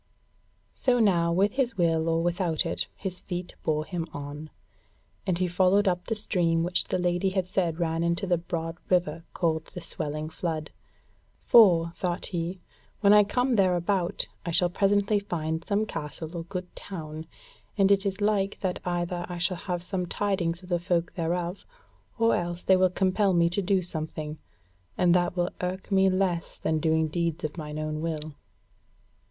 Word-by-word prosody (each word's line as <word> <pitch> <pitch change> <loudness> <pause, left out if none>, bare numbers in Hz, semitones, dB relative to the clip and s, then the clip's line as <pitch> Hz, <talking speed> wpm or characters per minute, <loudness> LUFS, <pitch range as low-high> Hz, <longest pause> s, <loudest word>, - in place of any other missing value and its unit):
So 250 -2 +3
now, 175 -6 +3
with 195 +4 +3
his 255 -3 -1
will 165 -2 +2
or 165 0 +1
without 175 -2 0
it, 90 +2 -1
his 185 -2 -5
feet 175 -1 -5
bore 155 -1 0
him 170 -2 -4
on, 145 +2 -7 0.8
and 180 -2 +1
he 185 0 +1
followed 185 +3 +3
up 180 -1 0
the 225 - 0
stream 170 -5 +1
which 175 +1 0
the - - -1
Lady 180 +1 +1
had 190 -1 0
said 180 -3 0
ran 165 -1 0
into 170 +3 0
the 175 -3 +1
broad 165 0 -4
river 170 -3 +1
called 160 -2 0
the 180 - -9
Swelling 155 -2 -4
Flood; 160 -2 -3 0.7
"for," 175 -7 +6
thought 175 -1 -2
he, 175 +1 -3 0.4
"when 200 -1 +6
I 210 0 +8
come 245 +4 +1
thereabout 180 -1 +1 0.2
I - - -4
shall 175 +1 +2
presently 205 +2 +2
find 160 -4 -3
some 205 +1 +1
castle 155 -1 -6
or 165 -1 -4
good 180 0 -6
town, 160 -4 -7 0.5
and 195 -1 +4
it 200 -1 +4
is 200 0 -2
like 205 -1 +1
that 185 -2 -1
either 175 0 -2
I 175 - -4
shall 175 +1 0
have 175 -1 -3
some 180 -1 -2
tidings 185 -3 -1
of 180 - -12
the 175 -1 +1
folk 175 -1 0
thereof, 175 +2 -2 0.5
or 230 0 +3
else 175 0 -3
they 190 - +5
will 185 0 +4
compel 190 +2 +2
me 170 -1 +3
to 200 - 0
do 190 0 +1
something, 155 -2 -4 0.6
and 175 -1 +4
that 175 0 +1
will 175 0 +1
irk 185 +2 -4
me 190 0 +5
less 185 -3 -1
than 160 -1 0
doing 160 0 +2
deeds 170 +1 -2
of 155 -1 -3
mine 150 -2 -6
own 155 0 -3
will." 155 -2 -3
175 Hz, 175 wpm, -27 LUFS, 165-190 Hz, 0.8 s, I